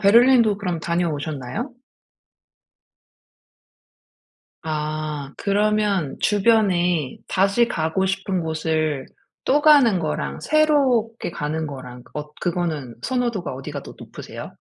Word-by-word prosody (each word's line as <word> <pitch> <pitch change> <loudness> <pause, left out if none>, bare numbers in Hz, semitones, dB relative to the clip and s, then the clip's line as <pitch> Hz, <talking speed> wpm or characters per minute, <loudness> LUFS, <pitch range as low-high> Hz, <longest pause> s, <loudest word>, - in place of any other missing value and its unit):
베를린도 230 0 +6
그럼 180 -5 -2
다녀오셨나요? 160 - -2 2.9
아. 155 -2 -3
그러면 205 -6 +1
주변에 190 - +2
다시 200 +5 +3
가고 165 +1 0
싶은 195 -1 -1
곳을 155 -3 -1 0.4
또 290 +2 +3
가는 280 - +6
거랑 155 -2 -3
새롭게 270 - +2
가는 155 +1 -3
거랑 125 -3 -8
엇 150 0 -6
그거는 160 -9 -2
선호도가 240 - -1
어디가 140 +2 -6
더 - - -11
높으세요? - - -9
175 Hz, 225 characters per minute, -22 LUFS, 155-215 Hz, 2.9 s, 베를린도